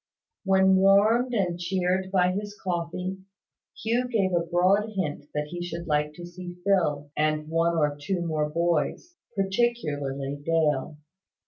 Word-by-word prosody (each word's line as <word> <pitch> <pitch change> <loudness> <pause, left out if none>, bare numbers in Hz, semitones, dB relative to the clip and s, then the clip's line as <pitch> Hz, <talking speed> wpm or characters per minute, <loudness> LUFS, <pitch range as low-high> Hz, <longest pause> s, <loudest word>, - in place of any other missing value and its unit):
When 190 0 +5
warmed 215 +6 +4
and 180 -4 0
cheered 185 +1 0
by 180 -2 +3
his 205 +2 -5
coffee, 180 +1 -3 0.6
Hugh 240 +3 +1
gave 200 -6 +1
a 175 - +4
broad 185 +5 +2
hint 150 -6 -3
that 150 0 -2
he 175 +1 -5
should 170 0 -5
like 150 -1 0
to 175 - -8
see 175 0 -9
Phil, 150 -7 +1
and 155 0 0
one 165 +1 +1
or 150 -2 +2
two 175 +3 -2
more 155 -2 0
boys 170 - -1 0.2
particularly 145 - -1
Dale. 150 -3 +1
175 Hz, 140 wpm, -26 LUFS, 155-195 Hz, 0.6 s, When